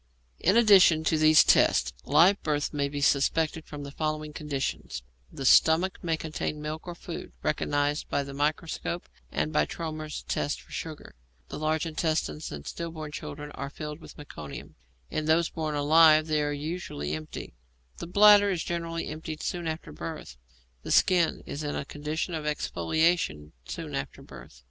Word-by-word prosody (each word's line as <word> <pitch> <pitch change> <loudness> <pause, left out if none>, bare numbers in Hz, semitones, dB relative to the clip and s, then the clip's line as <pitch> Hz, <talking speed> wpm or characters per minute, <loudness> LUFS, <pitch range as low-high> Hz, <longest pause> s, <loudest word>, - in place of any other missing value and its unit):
In 190 +6 +3
addition 190 -8 +6
to 160 0 +2
these 155 0 +7
tests, 65 - +4
live 170 +8 +5
birth 150 -1 -1
may 140 -1 0
be 145 0 -4
suspected 155 +3 +2
from 145 -1 -8
the 140 - -7
following 155 0 -3
conditions: 135 - -4 0.3
The 135 - -6
stomach 165 +7 +4
may 165 -2 0
contain 155 -1 -4
milk 155 +3 -6
or 175 - -5
food, 170 0 -8
recognized 145 0 0
by 140 - 0
the 140 0 -8
microscope 155 +4 -2 0.2
and 75 +2 -1
by 75 0 +2
Trommer's 155 -2 -5
test 145 - -2
for - - -18
sugar; 155 - -7 0.4
the - - -6
large 155 +1 0
intestines 160 -1 -2
in 70 -1 -7
stillborn 160 -3 -6
children 150 -1 -7
are 140 - -6
filled 150 +1 -7
with - - -13
meconium, 75 - -9 0.4
in 155 - -2
those 160 +2 +3
born 155 -2 -3
alive 155 +1 +6
they 155 -1 +1
are 145 0 0
usually 145 - -4
empty; 80 0 -6 0.4
the - - -6
bladder 205 +2 +7
is 180 -4 -1
generally 165 -1 -3
emptied 155 0 -6
soon 175 -2 -3
after 160 0 -5
birth; 155 - -7 0.5
the - - -8
skin 175 -3 +3
is 145 - -5
in 145 -1 -3
a - - -3
condition 150 +4 -4
of 155 -2 -3
exfoliation 150 - 0
soon - - -6
after 70 - -5
birth. - - -13
155 Hz, 165 wpm, -28 LUFS, 145-165 Hz, 0.5 s, these